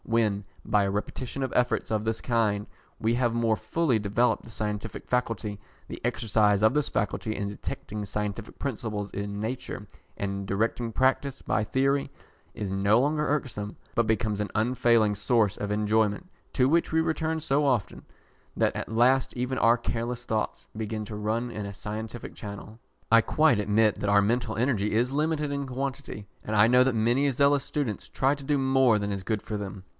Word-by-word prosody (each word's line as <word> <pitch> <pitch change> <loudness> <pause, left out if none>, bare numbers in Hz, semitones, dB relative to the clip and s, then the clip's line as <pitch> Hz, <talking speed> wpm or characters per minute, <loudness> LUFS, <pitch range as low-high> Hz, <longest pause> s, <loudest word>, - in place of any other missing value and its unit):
When, 110 -3 +1 0.2
by 105 -1 +3
a 100 - 0
repetition 125 +6 -4
of 130 -2 -2
efforts 120 -2 +1
of 110 -1 0
this 110 0 -1
kind, 105 -4 +1 0.3
we 115 +1 +1
have 120 -1 +1
more 115 -1 +2
fully 155 -1 0
developed 110 +3 +1
the - - -12
scientific 105 0 -4
faculty, 115 -4 -1 0.3
the - - -8
exercise 105 -2 +2
of 110 - +5
this 150 -1 +1
faculty 100 +1 -1
in 100 - -2
detecting 105 +1 -5
scientific 105 +2 -4
principles 110 -6 -3
in 100 0 -4
nature, 110 -1 -4 0.3
and 100 -1 -2
in - - -6
directing 115 +4 -1
practice 130 +3 +1
by 110 - 0
theory, 135 +5 +1 0.5
is 105 - -3
no 100 +3 +3
longer 150 +3 +1
irksome, 120 -8 -2 0.2
but 115 - +3
becomes 110 -2 0
an 105 - -2
unfailing 115 -1 +3
source 105 0 +2
of 105 0 -4
enjoyment, 105 - +1 0.2
to 130 -1 +3
which 165 +4 +2
we 160 - +3
return 160 0 0
so 145 -1 +1
often, 125 -9 0 0.5
that - - +2
at - - -4
last 125 +3 +3
even 125 +1 -1
our 115 +1 +5
careless 120 +1 -3
thoughts 110 -2 -2
begin 110 0 -3
to 105 - -7
run 110 +3 -1
in 105 -3 -5
a 100 - -6
scientific 110 +3 -6
channel. 105 +1 -8 0.3
I 115 0 +7
quite 155 -2 +3
admit 105 +1 +3
that 105 - 0
our 100 0 +5
mental 110 +1 0
energy 115 -4 +1
is 120 +4 +2
limited 150 0 0
in 140 0 -2
quantity, 130 -5 -5 0.2
and 110 - -4
I 105 +1 +6
know 125 +1 +6
that 130 -2 +1
many 120 +6 +2
zealous 140 +1 +3
students 130 -9 -3
try 135 +2 +1
to 140 - -11
do 145 +1 +1
more 130 -4 +4
than 100 0 -2
is 100 -1 -4
good 110 0 -1
for 110 - -5
them. 100 -2 -6
115 Hz, 185 wpm, -27 LUFS, 105-130 Hz, 0.5 s, I